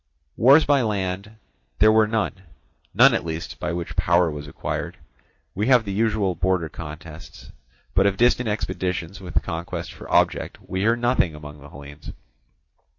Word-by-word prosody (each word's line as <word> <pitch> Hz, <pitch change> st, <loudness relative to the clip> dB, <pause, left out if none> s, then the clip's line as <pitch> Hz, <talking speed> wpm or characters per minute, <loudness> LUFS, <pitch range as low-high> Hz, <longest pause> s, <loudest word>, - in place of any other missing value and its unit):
Wars 140 Hz, +6 st, +6 dB
by 140 Hz, -2 st, +3 dB
land 100 Hz, -1 st, -3 dB, 0.4 s
there 110 Hz, +1 st, +6 dB
were 110 Hz, 0 st, +4 dB
none, 110 Hz, -1 st, -1 dB, 0.6 s
none -, -, +6 dB
at -, -, 0 dB
least 80 Hz, +1 st, -6 dB
by 90 Hz, -, -2 dB
which 85 Hz, 0 st, -5 dB
power 85 Hz, -1 st, +2 dB
was 75 Hz, 0 st, -7 dB
acquired; 75 Hz, -, -5 dB, 0.6 s
we 105 Hz, +4 st, -1 dB
have 125 Hz, -4 st, +4 dB
the 100 Hz, -, -4 dB
usual 105 Hz, -2 st, +1 dB
border 90 Hz, -1 st, 0 dB
contests, 80 Hz, +2 st, -10 dB, 0.4 s
but 95 Hz, +2 st, +4 dB
of 100 Hz, -1 st, 0 dB
distant 120 Hz, -1 st, +3 dB
expeditions 90 Hz, -3 st, -3 dB
with 90 Hz, -1 st, -2 dB
conquest 80 Hz, +1 st, -5 dB
for -, -, -11 dB
object -, -, +1 dB
we 95 Hz, -, -3 dB
hear 110 Hz, +4 st, +3 dB
nothing 120 Hz, -9 st, +1 dB
among 75 Hz, -1 st, -11 dB
the 70 Hz, -, -12 dB
Hellenes. 70 Hz, +2 st, -11 dB
95 Hz, 155 wpm, -23 LUFS, 80-110 Hz, 0.6 s, Wars